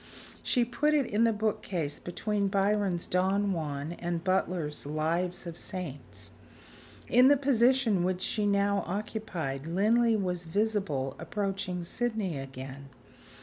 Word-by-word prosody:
She 245 -2 +2
put 295 +5 +1
it 285 -3 +3
in 220 +1 +2
the 230 - +4
bookcase 195 -8 -2
between 205 +3 -1
Byron's 195 -2 +1
"Don 195 +2 +1
Juan" 150 -2 -3
and 170 -1 -2
Butler's 180 -6 -1
"Lives 170 +5 -1
of 170 - -5
the - - -8
Saints." 175 -8 -5 0.8
In 250 +2 +6
the 285 +1 +6
position 255 -6 +3
which 185 0 0
she 210 -2 0
now 200 0 +2
occupied, 180 -8 -4
Linley 220 +6 +3
was 180 -4 -2
visible 190 -9 0
approaching 190 0 -3
Sydney 210 - -2
again. 135 +1 -8
190 Hz, 130 wpm, -29 LUFS, 165-215 Hz, 0.8 s, In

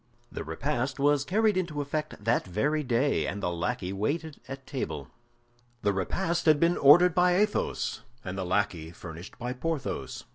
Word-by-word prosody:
The - - -5
repast 130 - -2
was 145 0 +3
carried 210 +5 +2
into 170 -5 -2
effect 145 -5 -3
that 115 +3 +2
very 145 - 0
day, 130 +1 +1
and 100 - -3
the 90 - 0
lackey 90 +2 -2
waited 145 +10 -2
at 135 0 -8
table. 80 - -4 0.7
The 100 - +2
repast 170 - -1
had 155 -2 +6
been 170 +2 +3
ordered 160 +5 +7
by 180 +1 +4
Athos, 210 +2 0 0.2
and 90 0 -4
the 95 - -2
lackey 90 -3 -1
furnished 85 +1 -10
by 125 +1 -3
Porthos. 155 +2 -3
135 Hz, 160 wpm, -28 LUFS, 100-160 Hz, 0.7 s, ordered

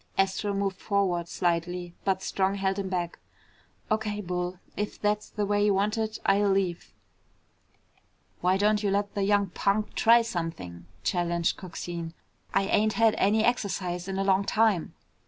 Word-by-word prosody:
Astro 195 +2 +1
moved 195 -1 -1
forward 190 -5 0
slightly, 175 0 -1
but 190 -1 +1
Strong 195 0 0
held 195 0 -1
him 195 -1 -3
back. 175 -2 -3 0.7
"O.K., 210 -1 0
Bull. 180 -1 -3 0.2
If 210 0 -4
that's 210 0 0
the 210 - -2
way 205 0 +1
you 205 -1 +3
want 205 +2 +1
it, 220 -1 -2
I'll 200 +1 +3
leave." 190 -3 0 1.5
"Why 185 +1 +2
don't 210 +1 +2
you 205 - +1
let 200 +1 0
the 205 - -2
young 200 0 +2
punk 205 +3 0
try 235 0 +5
something?" 165 - -5 0.2
challenged 175 -1 0
Coxine. 170 -2 -6 0.4
"I 195 - +2
ain't 210 +2 +2
had 225 -2 +4
any 215 +2 +3
exercise 185 -6 -1
in 190 0 -3
a 195 - +1
long 195 0 +3
time." 215 -5 +1
195 Hz, 155 wpm, -27 LUFS, 180-205 Hz, 1.5 s, try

